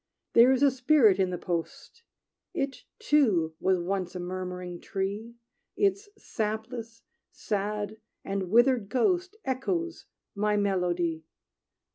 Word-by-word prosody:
"There 235 +3 +7
is 265 +1 +2
a 280 - +6
spirit 250 -6 +4
in 190 -1 +2
the 180 - -3
post; 175 - -5 0.5
It, 275 -5 -3
too, 225 - +2
was 190 0 +2
once 185 0 -2
a - - -3
murmuring 180 -1 -5
tree; 205 +4 -4 0.4
Its 400 +1 +1
sapless, 225 - -4 0.3
sad, 210 0 -3 0.3
and 195 -2 -2
withered 240 -1 +4
ghost 355 - +1
Echoes 335 +6 -2 0.3
my 210 0 +1
melody. 175 -5 0
210 Hz, 115 wpm, -28 LUFS, 185-260 Hz, 0.5 s, There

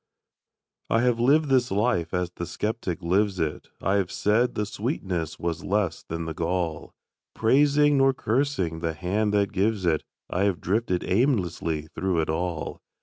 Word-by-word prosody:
I 115 - +3
have 120 -1 +2
lived 145 +5 +4
this 125 -2 +3
life 100 -4 +1
as 90 -1 -1
the 85 -1 -6
skeptic 100 -5 -3
lives 95 +2 +1
it; 75 -2 -2 0.2
I 95 +3 +2
have 95 -3 -1
said 115 +4 +1
the 105 - 0
sweetness 95 - -3
was 85 0 -3
less 100 -5 0
than 85 0 -5
the 80 - -4
gall; 85 -1 -2 0.4
Praising, 145 +4 +4
nor 135 0 +5
cursing, 115 - -1
the 80 -1 -2
Hand 100 +6 0
that 100 -1 +2
gives 100 0 +1
it, 80 -3 +2 0.3
I 95 +3 0
have 95 -4 0
drifted 95 -2 0
aimlessly 90 - 0
through 95 -3 0
it 80 - -1
all. 85 0 -3
95 Hz, 160 wpm, -26 LUFS, 85-115 Hz, 0.4 s, nor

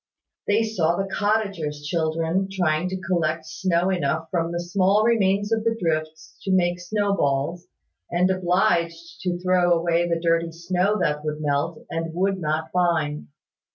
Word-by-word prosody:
They 210 +2 +3
saw 175 -7 +1
the 195 +1 -2
cottagers' 195 -9 -1
children 165 +4 0
trying 175 -2 0
to 190 0 -4
collect 165 -3 -1
snow 175 +2 0
enough 160 -2 -1
from 170 -2 0
the 170 - -2
small 190 +4 +2
remains 205 -2 +2
of 220 -1 +1
the 225 0 0
drifts 155 -2 -3
to 195 - -2
make 175 -1 +2
snow 205 +2 0
balls, 145 +4 -1 0.4
and 180 +2 +2
obliged 175 -2 0
to 180 -2 -1
throw 180 0 +2
away 170 0 +2
the 170 -1 +1
dirty 165 0 +1
snow 180 +5 0
that 150 -3 0
would 150 0 -3
melt, 150 +2 -1
and 165 0 -3
would 190 +1 +1
not 160 0 -2
bind. 165 -5 0
175 Hz, 155 wpm, -24 LUFS, 160-190 Hz, 0.4 s, They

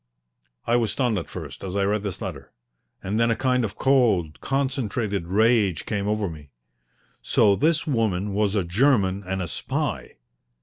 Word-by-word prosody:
I 120 - +3
was 115 -3 0
stunned 120 -7 0
at 85 - -8
first - - -8
as 95 0 -5
I 100 -1 +2
read 105 +1 0
this 100 +1 -5
letter, 70 -9 -7 0.5
and 100 +4 -1
then 115 0 +3
a 115 - +2
kind 125 +1 +1
of 105 - -4
cold, 115 - +2
concentrated 120 - -1
rage 105 -2 +2
came 100 -2 -2
over 105 -1 0
me. 75 -4 -9 0.7
So 100 -2 +3
this 160 +7 +1
woman 105 - 0
was 105 0 +1
a 100 - +2
German 100 0 +2
and 95 0 -3
a - - -4
spy! 70 - -3
105 Hz, 170 wpm, -24 LUFS, 95-120 Hz, 0.7 s, I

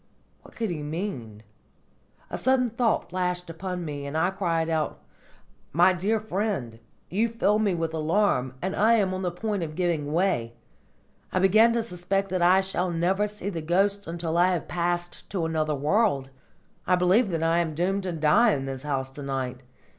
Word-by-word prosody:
What - - -17
could 225 -4 -2
he 155 -3 -4
mean? 145 - -5 0.9
A - - -2
sudden 255 -2 +2
thought 235 -4 0
flashed 180 -1 -2
upon 180 +1 -5
me, 145 -2 -5
and 145 +3 -3
I 175 +4 +2
cried 170 -4 -1
aloud: 160 -2 -1 0.8
"My 175 +4 +5
dear 200 +5 0
friend, 195 - -3 0.3
you 215 +6 +2
fill 220 -2 +1
me 205 -4 +1
with 165 -1 -2
alarm, 155 -5 +1
and 190 +1 -1
I 220 +3 +4
am 200 -5 +2
on 185 - -3
the 180 - 0
point 200 +3 -3
of 155 -2 -4
giving 165 -5 -1
way! 160 -10 0 0.8
I - - -1
begin 215 +5 +5
to 235 -1 0
suspect 195 0 -2
that 185 -1 -1
I 185 +2 +5
shall 185 -1 -1
never 180 +5 +1
see 205 -1 -5
the 165 -3 -4
ghosts 195 +5 +1
until 165 0 -2
I 180 - +5
have 170 - -3
passed 175 0 -3
to 185 -5 -1
another 155 -2 0
world. 145 -2 +1 0.6
I 180 - +5
believe 185 +6 +3
that 165 -2 -1
I 165 +1 +3
am 160 -3 -1
doomed 190 +4 0
to 185 -1 -3
die 165 +9 +4
in 135 -1 -4
this 135 -1 -5
house 135 -2 -2
to 145 - -9
night! 130 -2 -3
175 Hz, 185 wpm, -26 LUFS, 155-195 Hz, 0.9 s, My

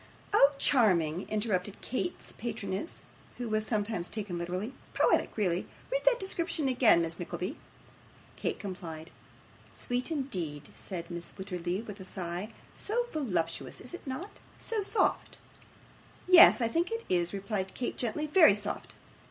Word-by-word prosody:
'Oh, 285 -8 +6
charming!' 185 - +3
interrupted 205 -2 -1
Kate's 345 +8 -3
patroness, - - -4 0.3
who 245 - -3
was 215 0 0
sometimes 210 -5 -1
taken 200 -5 -4
literary. 180 +8 -3 0.2
'Poetic, - - +2
really. 185 -4 0 0.2
Read - - +1
that - - +5
description 335 -5 0
again, 240 -9 +5
Miss 165 0 -4
Nickleby.' 180 - -4 0.8
Kate - - -2
complied. 170 -4 -7 0.6
'Sweet, 245 +3 -2
indeed!' 180 - -3
said 170 -3 -6
Mrs. 170 -1 -6
Wititterly, 185 +1 -3
with 205 -1 -8
a - - -7
sigh. 180 +3 -4 0.2
'So 475 +4 -1
voluptuous, 180 - -2
is 250 - -11
it 355 - -8
not 290 +10 -6 0.2
so 450 -2 -2
soft?' 405 +3 +1 0.9
'Yes, 360 -7 +9
I 230 - +3
think 335 +8 0
it 455 0 -3
is,' 175 -1 +1
replied 195 -1 -3
Kate, 245 - -2
gently; 245 +6 -1
'very 305 - +7
soft. 205 0 -4
210 Hz, 140 wpm, -31 LUFS, 180-275 Hz, 0.9 s, Yes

